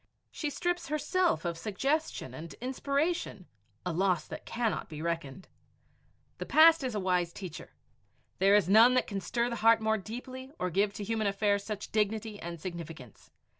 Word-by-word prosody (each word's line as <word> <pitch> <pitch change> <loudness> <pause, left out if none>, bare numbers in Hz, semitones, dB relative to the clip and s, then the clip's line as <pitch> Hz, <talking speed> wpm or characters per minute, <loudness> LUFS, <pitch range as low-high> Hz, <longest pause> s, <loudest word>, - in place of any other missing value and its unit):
She 300 - -3
strips 350 +4 -2
herself 330 - +1
of 170 -1 -2
suggestion 270 - -2
and 160 +5 -8
inspiration 280 - -2 0.4
a 180 - -1
loss 180 -2 +1
that - - -8
cannot 230 -2 -2
be 155 -2 -7
reckoned. 170 -1 -4 0.9
The - - -4
past 320 -1 +7
is 250 -4 -2
a - - 0
wise 180 -2 +1
teacher. 175 -4 -9 0.6
There 195 +2 +5
is 205 -4 +4
none 225 +6 +7
that 255 - +3
can 200 -2 -4
stir 235 +6 0
the 235 -1 -3
heart 225 +1 +5
more 220 0 +1
deeply 255 +5 -8
or 180 0 -2
give 200 +4 +2
to 205 - -6
human 220 0 -1
affairs 200 0 +1
such 210 -1 -6
dignity 215 0 -1
and 170 0 -6
significance. 165 - -8
210 Hz, 170 wpm, -30 LUFS, 180-250 Hz, 0.9 s, past